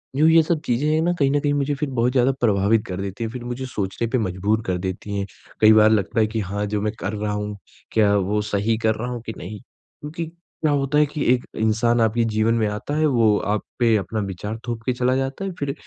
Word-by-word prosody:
जो 150 - +3
ये 165 0 +7
सब 160 -1 0
चीज़ें 125 +5 0
हैं 160 - +2
न 175 +2 +1
कहीं 140 -4 +2
न 145 - +2
कहीं 145 0 0
मुझे 145 0 0
फ़िर 140 +1 -3
बहुत 120 +1 +2
ज़्यादा 130 +1 +3
प्रभावित 105 -1 +2
कर 95 0 -5
देती 100 +3 -5
हैं, 115 - -2
फ़िर 125 0 -7
मुझे 125 +2 -4
सोचने 105 -1 -3
पे 130 - 0
मजबूर 105 +1 0
कर 90 -1 -1
देती 95 +2 -4
हैं। 100 - -1 0.4
कई 110 0 +8
बार 110 0 +6
लगता 110 +1 +1
है 110 - +4
कि 110 +1 -3
हाँ, 100 +1 -2
जो 105 0 -2
मैं 105 +1 -1
कर 95 - -3
रहा 105 0 -2
हूँ 105 0 -4 0.3
क्या 105 -2 +3
वो 100 +2 0
सही 105 +2 0
कर 110 -1 +1
रहा 120 +3 -4
हूँ 120 -2 -5
कि 110 - -5
नहीं? 105 +4 -7
क्योंकि 150 +5 -9
क्या 165 -2 -4
होता 140 0 +1
है 150 - +5
कि 150 0 -4
एक 125 - -2
इंसान 115 +2 +2
आपके 115 +1 +2
जीवन 110 +1 +1
में 115 -2 +1
आता 105 +8 -4
है, 155 - +3
वो 115 -7 +3
आप 105 +1 -1 0.2
पे 115 -2 +4
अपना 110 +2 -3
विचार 105 +2 -4
थोप 115 -1 -3
के 125 - +1
चला 125 +1 +1
जाता 135 +8 -2
है। 195 - -3
फ़िर 140 -1 -2
115 Hz, 255 wpm, -22 LUFS, 105-135 Hz, 0.4 s, कई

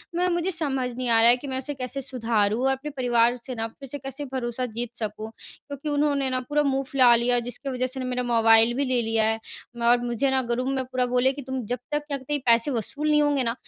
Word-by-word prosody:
मैं 360 +1 +1
मुझे 345 +2 0
समझ 270 -6 -1
नहीं 255 -1 -3
आ 230 - +5
रहा 230 - +7
है 245 - +5
कि 280 - -9
मैं 260 -1 -2
उसे 280 +2 -4
कैसे 260 +1 -5
सुधारूँ 225 -4 0
और 270 - +3
अपने 270 +3 -4
परिवार 240 -3 +2
से 255 +1 -8
न 225 - -1
फिर 275 -2 -10
से 285 - -5
कैसे 270 +2 -6
भरोसा 250 -1 -2
जीत 235 0 -4
सकूँ? 215 0 -5 0.4
क्योंकि 285 +1 -5
उन्होंने 285 -2 +1
न 255 - +1
पूरा 295 0 +2
मुँह 270 -1 0
फुला 255 -3 +6
लिया, 245 +1 +2
जिसके 245 +3 -6
वजह 255 -1 -1
से 265 +1 -7
मेरा 250 0 -2
मोबाइल 225 -1 +5
भी 280 - +1
ले 255 -2 +1
लिया 225 -1 +1
है 220 0 +1 0.5
और 240 - +6
मुझे 240 +3 0
न 265 - +3
ग्रुप 250 +2 -1
में 270 -1 -1
पूरा 255 0 -1
बोले 250 +1 +2
कि 285 - -7
तुम 260 -1 -4
जब 245 +4 -3
तक 295 0 -1
क्या 280 -1 -2
कहते, 290 +3 -3
पैसे 235 +4 +3
वसूल 285 +6 -2
नहीं 300 0 +4
होंगे 290 -3 +2
न, 230 - 0
255 Hz, 250 wpm, -25 LUFS, 240-275 Hz, 0.5 s, रहा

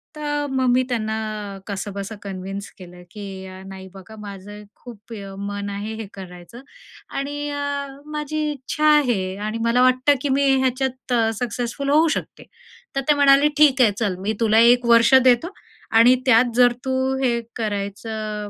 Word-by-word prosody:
तर 295 -1 -2
मग 260 -1 0
मी 255 +1 +3
त्यांना 215 -3 -4
कसंबसं 200 +1 -5
कन्व्हिन्स 195 +1 -6
केलं 180 -1 -13
की, 205 0 -8 0.2
"अ, 185 0 -11
नाही, 190 0 -10
बघा 195 +3 -12
माझं 205 0 -9
खूप 230 -2 -13
अ, 200 -3 -8
मन 205 0 -4
आहे 205 +2 -5
हे 220 -1 -7
करायचं 180 +4 -11 0.6
आणि 290 +1 -3
अ, 285 -1 -3 0.3
माझी 300 +1 -3
इच्छा 295 +2 -3
आहे 195 -9 0
आणि 215 +1 -3
मला 235 +2 +3
वाटतं, 255 +3 +4
की 285 - -2
मी 280 +1 +2
ह्याच्यात 260 0 -1
अ, 225 -2 +2
सक्सेसफुल 245 +3 -3
होऊ 310 +3 +4
शकते." - - -9 0.5
तर 275 - 0
ते - - +7
म्हणाले, 285 +1 +5
"ठीक 280 -4 +5
आहे, 220 -4 +5
चल. 205 -5 0
मी 210 +3 -1
तुला 220 0 +4
1 245 0 +1
वर्ष 235 +2 +5
देतो 260 +9 +3 0.4
आणि 230 +3 +6
त्यात 240 -1 +4
जर 245 -1 +5
तू 260 - -1 0.3
हे 235 -2 +1 0.2
करायचं 210 0 -4
अ, - - -10
230 Hz, 165 wpm, -21 LUFS, 205-265 Hz, 0.6 s, ते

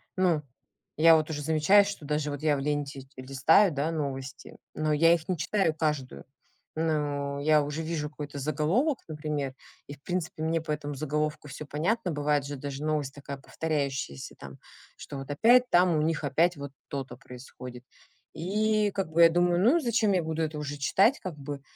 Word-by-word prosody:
ну, 175 -5 +2 0.5
я 165 +1 +7
вот 155 0 -2
уже 150 -2 -3
замечаю, 160 +7 +5
что 200 -6 -6
даже 150 0 -1
вот 145 -1 -6
я 155 -1 +2
в - - -3
ленте 145 -2 -3
листаю, 135 +8 +3
да, 145 +3 -1
новости, 140 -3 -5 0.2
но 155 0 0
я 165 +3 +5
их 165 -2 -2
не 185 - -1
читаю 190 0 +1
каждую. 150 -5 -2 0.5
Ну, 145 -3 -1
я 150 +1 +4
уже 145 +2 -4
вижу 160 -2 -3
какой-то 145 -1 -7
заголовок, 160 - +1
например, 150 -3 -3 0.3
и, 145 - -7
в 140 - -30
принципе, 175 -3 -3
мне 165 +1 0
по 160 -1 -5
этому 145 -1 -3
заголовку 150 +1 -2
всё 140 +2 -7
понятно. 175 +7 -1
Бывает 145 -1 0
же 145 +1 -5
даже 140 +1 -6
новость 150 -3 -1
такая 140 0 -7
повторяющаяся, 140 - -3
там, - - -11 0.4
что 140 - -8
вот 135 +1 -8
опять 245 +11 +5
там 175 -2 +4
у - - +2
них 155 0 0
опять 165 +5 +2
вот 140 -1 -7 0.2
то-то 135 -3 -5
происходит. 125 -1 -11 0.5
И 210 +4 +1
как 190 -5 -3
бы 170 - +4
я 165 - +9
думаю: 175 +1 +2
"Ну 245 - +5
и - - 0
зачем 230 -5 +2
я 185 - +2
буду 160 0 -3
это 155 -1 -2
уже 145 -1 -4
читать?" 195 - +3
Как 180 -5 -6
бы 140 0 -6
150 Hz, 190 wpm, -28 LUFS, 145-170 Hz, 0.5 s, я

